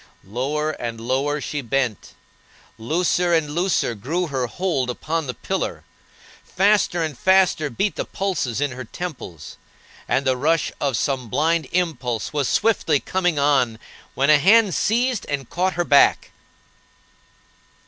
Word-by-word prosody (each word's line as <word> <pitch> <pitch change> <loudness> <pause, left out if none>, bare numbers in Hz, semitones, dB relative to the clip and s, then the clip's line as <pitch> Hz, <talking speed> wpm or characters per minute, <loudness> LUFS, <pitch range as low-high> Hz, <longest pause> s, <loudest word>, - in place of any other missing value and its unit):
Lower 140 +9 -2
and 115 -6 -6
lower 135 +5 -1
she 145 0 -4
bent; 125 -3 -2 0.6
looser 175 +7 +1
and 155 -3 0
looser 170 -6 0
grew 155 - -2
her 135 -5 -2
hold 140 -4 -1
upon 155 +5 -3
the 125 - -4
pillar; - - -3 0.6
faster 195 -3 +2
and 155 -3 -3
faster 185 -3 +3
beat 200 - -2
the - - -1
pulses 165 - -2
in 145 -1 0
her 130 +1 -7
temples, 125 - -8 0.5
and 140 - 0
the 130 -1 +2
rush 155 +5 +1
of 135 -5 0
some 130 -3 -2
blind 160 +6 +1
impulse 150 -11 -2
was 145 -3 0
swiftly 200 -9 +2
coming 180 -1 -1
on, 135 -5 +2 0.4
when 140 +3 +3
a 150 - +6
hand 205 +3 +5
seized 240 - +1
and 140 -3 -4
caught 185 +2 0
her 175 - -1
back. 140 -3 +4
150 Hz, 140 wpm, -22 LUFS, 130-175 Hz, 0.6 s, a